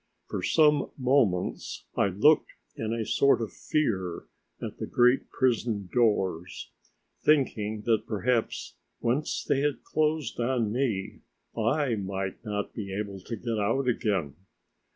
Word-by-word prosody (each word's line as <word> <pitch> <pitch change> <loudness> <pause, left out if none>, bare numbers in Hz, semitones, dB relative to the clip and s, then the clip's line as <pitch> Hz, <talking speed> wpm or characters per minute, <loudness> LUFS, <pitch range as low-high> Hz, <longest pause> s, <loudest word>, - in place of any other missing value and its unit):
For - - -4
some 150 -2 +3
moments 125 -9 +1
I - - +3
looked 105 - +4 0.3
in 110 -1 -3
a 115 -1 -1
sort 140 +3 +3
of 110 -6 -4
fear 95 - -1 0.4
at - - -6
the - - -3
great 125 +2 +3
prison 115 -6 0
doors, 95 -8 0 0.5
thinking 110 -8 +2
that 110 -1 +1
perhaps 115 +2 -1 0.3
once 130 +6 0
they 135 - +1
had 145 0 -1
closed 155 -5 0
on 120 -3 +1
me 115 -6 -1 0.4
I 125 +4 +1
might 95 0 -4
not 105 -2 -3
be 100 -3 -5
able 100 0 -4
to 115 +6 -6
get 115 0 -3
out 115 +6 +1
again. 100 - 0
115 Hz, 130 wpm, -28 LUFS, 100-130 Hz, 0.5 s, looked